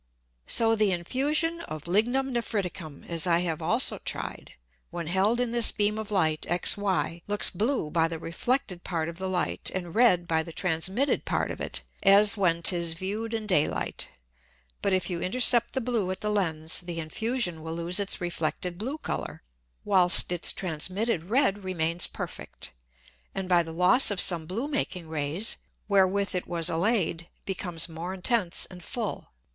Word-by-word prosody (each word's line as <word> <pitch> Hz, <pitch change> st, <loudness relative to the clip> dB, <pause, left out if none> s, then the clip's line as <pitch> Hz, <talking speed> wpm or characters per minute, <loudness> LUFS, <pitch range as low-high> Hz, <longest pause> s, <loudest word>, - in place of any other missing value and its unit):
So 225 Hz, -1 st, +3 dB
the 210 Hz, -3 st, +2 dB
Infusion 295 Hz, -, 0 dB
of 155 Hz, -1 st, -7 dB
Lignum 245 Hz, +8 st, +1 dB
Nephriticum 190 Hz, -9 st, -4 dB
(as 170 Hz, +1 st, -1 dB
I 170 Hz, 0 st, +3 dB
have 165 Hz, -3 st, -3 dB
also -, -, +2 dB
tried) -, -, -6 dB, 0.4 s
when 170 Hz, -1 st, -5 dB
held 190 Hz, +8 st, +1 dB
in 245 Hz, -2 st, 0 dB
this 235 Hz, -1 st, +5 dB
beam 210 Hz, 0 st, 0 dB
of 220 Hz, -1 st, -5 dB
Light 160 Hz, -7 st, +1 dB
XY, 180 Hz, -1 st, 0 dB
looks 205 Hz, 0 st, +3 dB
blue 210 Hz, -, -1 dB
by 165 Hz, -1 st, +2 dB
the 165 Hz, 0 st, -5 dB
reflected 180 Hz, -, -2 dB
Part 165 Hz, -3 st, -2 dB
of 170 Hz, +1 st, -10 dB
the 190 Hz, 0 st, -3 dB
Light, 180 Hz, -2 st, -1 dB
and 175 Hz, -3 st, -4 dB
red 185 Hz, -8 st, +4 dB
by 160 Hz, -1 st, +2 dB
the 165 Hz, -, -7 dB
transmitted 185 Hz, -, 0 dB
Part -, -, -1 dB
of -, -, -7 dB
it, -, -, -3 dB, 0.2 s
as 200 Hz, +2 st, +5 dB
when 170 Hz, -4 st, +1 dB
'tis 170 Hz, -2 st, +2 dB
view'd 210 Hz, +5 st, -4 dB
in 220 Hz, -1 st, -4 dB
Day 180 Hz, -8 st, +3 dB
light; -, -, -4 dB, 0.7 s
but 200 Hz, -, +1 dB
if 185 Hz, -1 st, +1 dB
you 175 Hz, -2 st, -3 dB
intercept 240 Hz, +4 st, +3 dB
the 265 Hz, -, 0 dB
blue 230 Hz, -6 st, -1 dB
at 185 Hz, 0 st, -2 dB
the 210 Hz, -, -1 dB
Lens 160 Hz, -6 st, -1 dB
the 175 Hz, -2 st, -5 dB
Infusion 175 Hz, +2 st, -2 dB
will 160 Hz, +1 st, -5 dB
lose 170 Hz, +3 st, 0 dB
its 200 Hz, 0 st, 0 dB
reflected 175 Hz, 0 st, -3 dB
blue 260 Hz, +8 st, -3 dB
Colour, -, -, -5 dB, 0.4 s
whilst 185 Hz, -3 st, +6 dB
its 175 Hz, -1 st, +1 dB
transmitted 185 Hz, +3 st, -2 dB
red 210 Hz, -2 st, +1 dB
remains 170 Hz, -2 st, 0 dB
perfect, -, -, -7 dB, 0.6 s
and 195 Hz, -1 st, -3 dB
by 175 Hz, -1 st, +4 dB
the 165 Hz, -1 st, -6 dB
loss 180 Hz, +10 st, +5 dB
of 200 Hz, -3 st, -1 dB
some 165 Hz, -4 st, +3 dB
blue 225 Hz, -, -3 dB
making 195 Hz, -, -2 dB
Rays, 160 Hz, +7 st, -1 dB, 0.3 s
wherewith 200 Hz, 0 st, +2 dB
it 180 Hz, -, -3 dB
was 170 Hz, -2 st, -1 dB
allay'd, 170 Hz, -2 st, 0 dB, 0.2 s
becomes 175 Hz, -4 st, -1 dB
more 170 Hz, +3 st, -6 dB
intense 190 Hz, -2 st, +2 dB
and 180 Hz, -1 st, -12 dB
full. -, -, -4 dB
185 Hz, 170 wpm, -27 LUFS, 170-215 Hz, 0.7 s, whilst